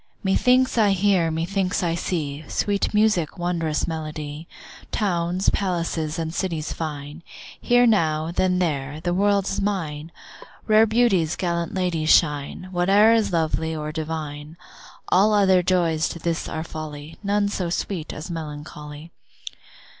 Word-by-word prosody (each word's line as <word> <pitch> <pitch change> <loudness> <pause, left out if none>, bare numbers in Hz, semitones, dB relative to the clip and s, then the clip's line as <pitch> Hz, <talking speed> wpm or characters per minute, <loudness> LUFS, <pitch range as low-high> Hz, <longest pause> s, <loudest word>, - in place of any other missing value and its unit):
Methinks 250 +6 +3
I 205 -3 +4
hear, 190 -3 +2
methinks 180 +4 -1
I 170 -1 +1
see, 155 -4 -3
Sweet 200 -1 0
music, 210 -7 +2
wondrous 170 -3 -1
melody, 155 -1 -5 0.4
Towns, 180 -2 0
palaces, 165 -5 -2
and 160 -1 -3
cities 165 -5 -2
fine; 150 0 -6 0.4
Here 245 0 +4
now, 160 -7 +2
then 180 +1 +1
there; 145 -4 -2
the 175 +1 -1
world 200 +1 +2
is - - -2
mine, 165 -6 -3 0.5
Rare 220 +1 +5
beauties, 215 -8 +2
gallant 170 -1 -2
ladies 170 -4 -1
shine, 150 +3 +2
Whate'er 195 +5 +4
is 225 -3 +2
lovely 160 -1 0
or 150 0 -4
divine. 155 -1 -5 0.5
All 210 +3 +4
other 190 -3 +4
joys 170 -3 +1
to - - -6
this 170 0 -2
are 160 - -3
folly, 155 -1 -8
None 205 0 +1
so 185 -4 -2
sweet 170 -1 -3
as 155 +4 -7
melancholy. 150 0 -8
170 Hz, 135 wpm, -23 LUFS, 155-195 Hz, 0.5 s, Rare